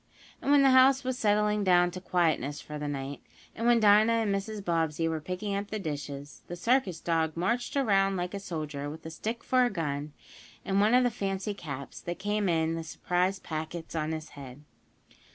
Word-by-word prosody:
And - - -3
when 285 -1 +6
the 270 - +6
house 265 +1 +6
was 255 0 -1
settling 210 0 +2
down 175 -2 +4
to 185 +1 -7
quietness 155 -6 0
for 150 0 -7
the 150 - -3
night, 140 -1 -5 0.3
and 230 - -2
when 240 -1 +5
Dinah 215 +1 +6
and 225 -3 +1
Mrs. 200 +1 -4
Bobbsey 165 -1 0
were 160 -1 -2
picking 185 +5 -4
up 200 +1 -2
the 215 - -3
dishes, 145 -5 -6
the 175 - -5
circus 195 -3 +1
dog 165 -2 0
marched 235 +10 -1
around 195 -7 +3
like 180 +1 -3
a 200 - -3
soldier, 155 -6 -5
with 160 +2 -10
a 160 - -6
stick 225 +7 -4
for 255 -1 +3
a 245 - +2
gun, 150 -6 -3 0.5
and 195 +1 +2
one 215 +4 +4
of 250 - +5
the 245 - +2
fancy 195 -2 -3
caps, 140 -8 -7
that 175 0 -5
came 205 -1 0
in 160 -1 +1
the 165 0 -3
"surprise" 180 +3 -1
packets, 160 -1 -6
on 155 -1 -1
his 155 0 -5
head. 135 0 -11
180 Hz, 205 wpm, -29 LUFS, 160-210 Hz, 0.5 s, when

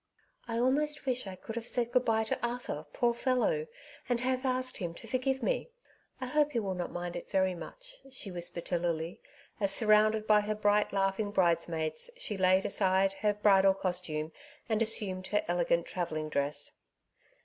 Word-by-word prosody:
^^I 230 0 -1
almost 295 +4 +1
wish 250 -4 0
I 190 - -6
could 225 +5 -8
have 235 0 -5
said 240 -1 0
good 250 0 +2
bye 220 -1 +2
to 220 - -2
Arthur, 240 -11 -3
poor 240 +6 +1
fellow, 265 - 0 0.4
and 245 -1 +1
have 255 +1 0
asked 255 0 0
him 170 -3 -4
to - - -10
forgive 265 +1 -1
me. - - -1 0.5
I 260 - -3
hope 295 +3 +1
he 235 - +1
will 195 -3 -2
not 180 -1 -4
mind 175 0 -5
it 175 - -7
very 190 -1 +2
much," - - -9
she 220 -6 -5
whispered 175 -1 -1
to 175 - 0
Lily, 165 0 -3 0.4
as 200 -2 +5
surrounded 215 0 +4
by 210 -1 +5
her 210 +1 -2
brigh!: 210 0 +2
laughing 195 +1 0
bridesmaids 170 - 0
she 235 - -2
laid 185 0 +3
aside 190 -1 +2
her 210 -1 +2
bridal 195 -2 +5
costume 175 -5 -2 0.4
and 220 -1 0
assumed 195 -4 +2
her 210 - 0
elegant 170 -1 +1
travelling 155 -4 -3
dress. 145 0 -2
205 Hz, 180 wpm, -31 LUFS, 180-245 Hz, 0.5 s, as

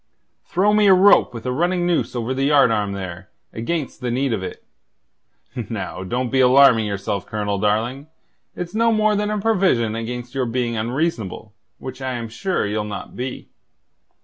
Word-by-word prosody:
"Throw 200 +4 +2
me 210 -1 +4
a 190 - +8
rope 200 +2 +5
with 115 -1 -9
a 125 - -1
running 175 +5 0
noose 175 -6 0
over 120 +1 -2
the 135 +1 0
yardarm 115 -9 +3
there, 95 -1 -7 0.2
against 140 +5 -3
the 125 - -2
need 130 +1 0
of 105 - -2
it. 95 - -7 1.1
Now, - - -5
don't 120 +5 -2
be 135 - +2
alarming 125 -3 +6
yourself, 100 0 -3
Colonel, 105 -2 -2
darling. 115 +8 -1 0.5
It's 175 +1 -6
no 230 +1 +3
more 215 -1 +2
than 210 +1 -1
a 210 - -1
provision 185 - +2
against 120 +2 -5
your 130 -2 -1
being 120 0 -1
unreasonable, 115 - -3 0.2
which 130 0 -8
I 130 -1 -2
am 120 -2 -5
sure 115 - -2
ye'll 105 +1 -2
not 105 -1 -7
be. 125 +1 -6
125 Hz, 175 wpm, -21 LUFS, 110-170 Hz, 1.1 s, a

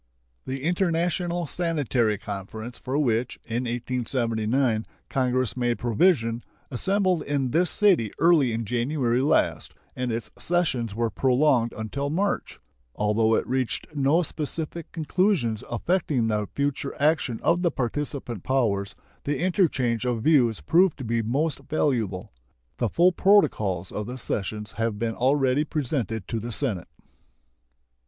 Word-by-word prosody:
The 130 0 -4
International 175 0 0
Sanitary 140 - 0
Conference 105 +4 -7
for 130 +2 -2
which, 120 -4 0
in 120 +2 -2
1879, 120 -1 0 0.2
Congress 130 -2 0
made 120 -1 0
provision 120 - +2 0.3
assembled 185 - +1
in 140 -3 -1
this 175 +4 +2
city 185 - +3
early 160 -7 +4
in 115 0 -2
January 125 +1 0
last, 150 +3 +1 0.2
and 125 -1 -2
its 115 0 -4
sessions 130 - 0
were 115 0 0
prolonged 130 -2 +2
until 135 +6 -3
March. 195 +7 -1 0.4
Although 110 +2 +2
it - - 0
reached 130 +3 -2
no 145 +5 +3
specific 160 +1 -4
conclusions 160 - 0
affecting 145 - 0
the 105 -2 0
future 140 -1 -1
action 145 -6 +1
of 170 +1 +3
the 175 - +3
participant 135 - -3
powers, 100 -7 0 0.3
the 145 0 -1
interchange 145 - +1
of 120 -3 -1
views 120 - +3
proved 170 - +3
to 135 - -6
be 115 0 0
most 140 +7 -1
valuable. 115 - -1 0.5
The 120 - 0
full 175 - +4
protocols 105 - +2
of 105 0 -4
the 125 +1 -6
sessions 105 -2 -3
have 115 -2 -1
been 115 +1 -1
already 135 +3 +2
presented 125 - -2
to 115 - -1
the 120 +2 -5
Senate. 110 - -2
125 Hz, 130 wpm, -25 LUFS, 115-155 Hz, 0.5 s, early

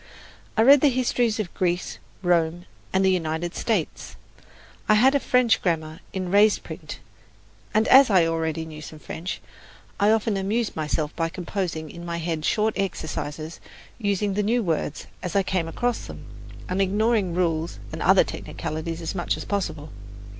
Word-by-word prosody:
I 220 - +5
read 275 +3 +8
the 295 - +6
histories 245 -3 +1
of 200 -5 -3
Greece, 180 -1 -1 0.2
Rome 175 0 +1 0.3
and 190 0 +2
the 190 - +5
United 170 -1 -1
States. 210 -9 -2 0.7
I 215 - +7
had 260 +6 +5
a 280 - +3
French 250 -3 +3
grammar 160 -2 -1
in 185 -2 -3
raised 205 +1 +4
print, - - -8 0.7
and 220 +1 +2
as 265 -1 +8
I 185 -5 +5
already 160 0 -1
knew 155 -1 -9
some 155 +1 -9
French, 165 +4 -6 0.6
I 205 - +4
often 220 -1 +2
amused 210 +4 -1
myself 155 -1 -2
by 165 -1 0
composing 175 -3 -4
in 170 - -9
my 170 -1 -3
head 165 -2 -2
short 215 0 +2
exercises, 160 -4 -4 0.4
using 200 -1 0
the 205 - +1
new 230 +3 +1
words 160 -4 -2 0.2
as 180 -2 -5
I 200 - +4
came 185 -3 -1
across 240 +8 -2
them, - - -9 0.4
and 185 +2 0
ignoring 205 -1 +1
rules 165 -2 0
and - - -6
other - - +6
technicalities 165 +2 -5
as 160 - -3
much 175 -3 -1
as - - -6
possible. 180 -7 -3
180 Hz, 165 wpm, -24 LUFS, 165-210 Hz, 0.7 s, read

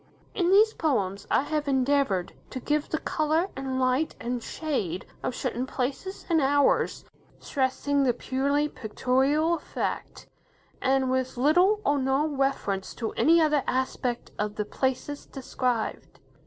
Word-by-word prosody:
In 355 -2 +1
these 430 +3 +6
poems, 200 - -1
I - - +3
have 300 0 -2
endeavoured 265 -8 +1 0.2
to 255 - -5
give 295 +3 -1
the 315 - 0
colour, 315 +4 0
and 265 -1 -3
light, 260 +4 +1
and 245 0 -3
shade, 215 - -3 0.2
of 250 - -3
certain 255 0 -2
places 275 +11 -4
and 325 -3 +3
hours, 285 +1 +2 0.3
stressing 280 +1 0
the 265 -2 +4
purely 280 +4 0
pictorial 270 +7 +1
effect, - - -4 0.6
and 265 -1 +2
with 260 0 -1
little 355 - +4
or 290 0 +2
no 265 +3 +1
reference 270 -9 -1
to 225 -2 -3
any 335 +2 +4
other 300 -3 +3
aspect 255 -1 -2
of 210 0 -2
the 210 - -2
places 265 +5 -2
described. 250 -3 -3
270 Hz, 140 wpm, -27 LUFS, 250-300 Hz, 0.6 s, these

